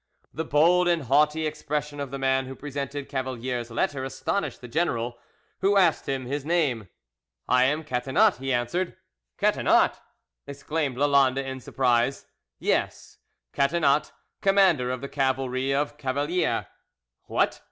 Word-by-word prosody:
The 160 - -3
bold 170 +4 +4
and 170 -3 +2
haughty 150 +4 +2
expression 150 -1 -3
of 140 -1 -4
the 135 - -5
man 135 -1 +1
who 135 - -7
presented 140 0 -5
Cavalier's 125 -2 -3
letter 130 +3 -1
astonished 165 +9 -3
the 125 - -10
general, 120 -4 -1 0.4
who 200 +1 +3
asked 175 -7 +3
him 135 -2 -2
his 140 +2 -3
name. 140 - 0 0.6
"I 125 0 +4
am 150 +4 0
Catinat," 135 - +2
he 135 0 -3
answered. 125 +9 -1 0.4
"Catinat!" - - +3 0.5
exclaimed 140 -1 -3
Lalande 135 -1 +3
in 130 0 -5
surprise. 125 0 0 0.3
"Yes, - - -2 0.3
Catinat, 145 0 +2 0.3
commander 190 -10 +4
of 130 0 -3
the 140 - -5
cavalry 130 -1 -1
of 145 +1 -1
Cavalier." 145 +6 0 0.6
"What!" - - 0
140 Hz, 130 wpm, -26 LUFS, 130-150 Hz, 0.6 s, bold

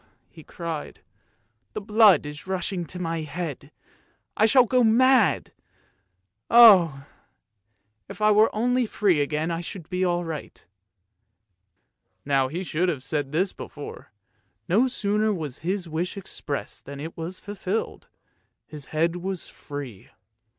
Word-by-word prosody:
" - - -45
he 160 - -14
cried, 165 -3 -6 0.4
" 115 0 -46
the - - -3
blood 210 -3 +5
is 150 +4 -8
rushing 185 -1 -2
to 180 - -8
my 165 -2 -3
head; 155 -2 -6 0.6
I 215 - +4
shall 255 +1 +5
go 250 +1 +2
mad. 235 - +4 1.0
Oh! 180 -12 +7 1.0
if 200 0 -9
I 215 0 +4
were 215 +1 +5
only 245 +2 +1
free 190 -8 +2
again 155 +3 -1
I 165 0 -2
should 170 -1 -9
be 180 0 0
all 175 -1 0
right." 160 -3 -7 1.6
Now 135 -2 +2
he 170 +7 -4
should 175 +1 0
have 145 -6 -3
said 145 -2 -2
this 180 +5 0
before; 145 - -10 0.6
no 220 +9 +3
sooner 215 -2 0
was 155 -9 -5
the 185 +3 -2
wish 170 +5 -3
expressed 150 -6 -6
than 140 0 -8
it 160 +3 -7
was 170 +3 -6
fulfilled, 205 +1 -4 0.6
his 150 -3 -9
head 165 +4 0
was 185 0 -5
free. 140 -9 -9
175 Hz, 140 wpm, -25 LUFS, 150-205 Hz, 1.6 s, Oh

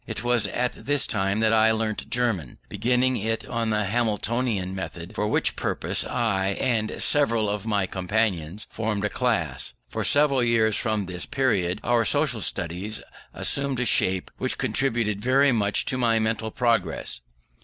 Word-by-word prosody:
It - - -5
was 120 -4 +2
at 125 +4 -1
this 145 0 -1
time 100 +1 0
that 110 0 +3
I 110 0 +5
learnt 110 -1 -2
German; 115 - -1
beginning 125 +2 +1
it 115 +2 -2
on 115 -1 -2
the 105 -1 +1
Hamiltonian 110 -2 -1
method, 95 -1 -6
for 105 - -1
which 110 - +1
purpose - - -2
I 95 -4 0
and 115 -4 0
several 115 -7 +2
of 105 +1 -3
my 100 -3 +1
companions 95 -1 -1
formed 105 -2 -2
a - - 0
class. 120 - -1
For - - -3
several 145 -2 +3
years 115 -2 +3
from 110 -3 -1
this 90 -1 -5
period, 105 -10 0
our 120 -1 +3
social 135 -1 +1
studies 90 +5 -3 0.3
assumed 140 -2 0
a 125 - +1
shape 95 -4 +2
which - - -1
contributed 115 -6 0
very 135 +4 +4
much 105 -4 +1
to 130 - -1
my 115 -2 +3
mental 110 0 -1
progress. 115 - 0
110 Hz, 160 wpm, -25 LUFS, 100-120 Hz, 0.3 s, I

